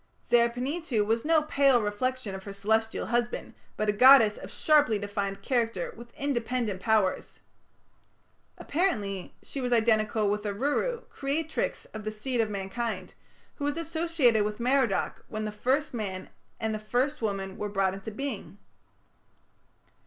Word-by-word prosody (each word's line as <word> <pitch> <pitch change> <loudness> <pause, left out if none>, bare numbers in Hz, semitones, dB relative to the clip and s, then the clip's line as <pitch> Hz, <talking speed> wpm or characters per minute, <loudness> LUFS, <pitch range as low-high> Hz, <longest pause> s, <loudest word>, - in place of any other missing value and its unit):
Zer 235 0 +4
panituᵐ 250 -2 -1
was 225 +2 +1
no 315 0 +3
pale 275 -4 +4
reflection 215 +1 -2
of 190 0 -7
her 200 - -6
Celestial 220 +3 0
husband, 240 +1 -1 0.2
but 215 - 0
a - - +4
goddess 225 -1 +7
of - - -9
sharply 295 -8 +3
defined 200 -1 -3
character 230 -8 -1
with 235 +1 -12
independent 240 -7 -1
powers. 215 -3 +1 1.2
Apparently 210 - -1
she 275 - -6
was 250 -1 -2
identical 220 -2 +2
with 205 +1 0
Aruru, 285 - -1
creatrix 300 +3 -2
of 215 0 -6
the 215 - -3
seed 235 +3 -1
of 220 - -1
mankind, 195 0 -4 0.4
who 285 - -6
was 290 +2 -1
associated 325 -8 +2
with 210 +1 -3
Merodach 250 -4 +1
when 215 0 -4
the 215 - -3
first 260 +8 0
man 195 -5 -4 0.3
and 220 -1 -1
the 215 - -3
first 245 +7 -1
woman 195 -3 -2
were 210 - -4
brought 195 -2 +1
into 195 +2 -6
being. 220 -3 -5
225 Hz, 145 wpm, -28 LUFS, 205-265 Hz, 1.2 s, goddess